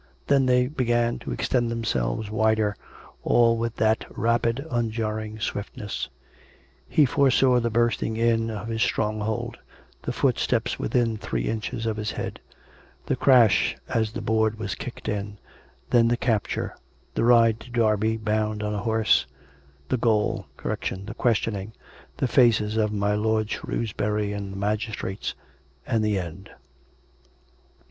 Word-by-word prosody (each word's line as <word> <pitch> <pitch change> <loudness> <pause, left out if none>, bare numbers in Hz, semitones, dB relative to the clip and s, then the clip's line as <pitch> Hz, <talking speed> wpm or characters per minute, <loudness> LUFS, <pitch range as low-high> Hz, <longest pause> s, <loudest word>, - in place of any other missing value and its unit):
Then 135 -2 +3
they 125 0 +4
began 120 -4 0
to - - -6
extend 120 -2 0
tKemselves 105 - -1
wider, 110 -1 +2 0.5
all 115 -1 +4
with 115 0 -2
that 110 0 +2
rapid 115 +3 +1
unjarring 110 -2 -2
swiftness: 105 0 -4 0.8
he 150 - +5
foresaw 130 -2 +4
the 120 0 0
bursting 115 -1 +1
in 115 -1 +2
of 110 0 -5
his 110 -1 -2
stronghold; 110 0 -1 0.4
the - - -3
footsteps - - 0
within 115 - +1
three - - -3
inches 115 - -3
of 110 -1 -1
his 110 0 -3
head; - - -5 0.7
the - - 0
crash 120 -6 +4
as 110 -4 0
the 115 - -5
board 110 0 +1
was 105 -3 -3
kicked - - -8
in: 105 0 -3 0.5
then 115 -1 +5
the 120 +1 +2
capture; 110 -4 -1 0.4
the - - 0
ride 115 -2 +5
to 125 - -12
Derby, 110 -2 +2
bound 110 -1 -1
on 105 0 -1
a 105 - -2
horse; 110 0 +2 0.6
the 130 - +1
gaol; 110 -3 +1 0.2
the 100 +3 -3
questioning; 110 -3 0 0.4
the 130 - +1
faces 115 -4 +3
of 105 -1 +1
my 105 0 0
lord 110 0 0
Shrewsbury 105 -2 -2
and 100 -1 -5
the 95 - -7
magistrates... 105 -1 -2 0.5
and 115 -3 +1
the 105 -2 +1
end. 90 +2 -6
110 Hz, 140 wpm, -25 LUFS, 105-115 Hz, 0.8 s, he